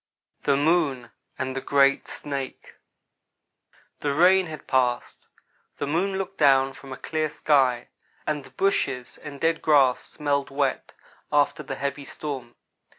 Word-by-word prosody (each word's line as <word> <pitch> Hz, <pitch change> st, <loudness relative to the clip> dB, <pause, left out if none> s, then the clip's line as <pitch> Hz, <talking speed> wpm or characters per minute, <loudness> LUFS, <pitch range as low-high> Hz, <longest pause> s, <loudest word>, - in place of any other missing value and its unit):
THE 140 Hz, -1 st, +3 dB
MOON 145 Hz, -6 st, +1 dB, 0.3 s
AND 130 Hz, 0 st, -3 dB
THE 135 Hz, -, -2 dB
GREAT 140 Hz, 0 st, +3 dB
SNAKE 140 Hz, -2 st, -6 dB, 1.3 s
THE 140 Hz, -1 st, -1 dB
rain 185 Hz, +3 st, +5 dB
had 155 Hz, -1 st, -9 dB
passed; 125 Hz, -2 st, 0 dB, 0.5 s
the -, -, -2 dB
moon 180 Hz, +7 st, 0 dB
looked 195 Hz, 0 st, -5 dB
down 135 Hz, -2 st, +4 dB
from 135 Hz, 0 st, -12 dB
a 130 Hz, -, -6 dB
clear 155 Hz, -1 st, -2 dB
sky, 135 Hz, -5 st, +2 dB, 0.4 s
and 150 Hz, -2 st, -2 dB
the -, -, -14 dB
bushes 135 Hz, -10 st, -1 dB
and 145 Hz, -2 st, -9 dB
dead 165 Hz, +2 st, +1 dB
grass 140 Hz, -5 st, +4 dB
smelled 145 Hz, -2 st, -2 dB
wet, 135 Hz, -1 st, -1 dB, 0.4 s
after 150 Hz, +2 st, +2 dB
the 145 Hz, -, -5 dB
heavy 140 Hz, 0 st, -3 dB
storm. 135 Hz, -7 st, -6 dB
140 Hz, 140 wpm, -25 LUFS, 135-155 Hz, 1.3 s, rain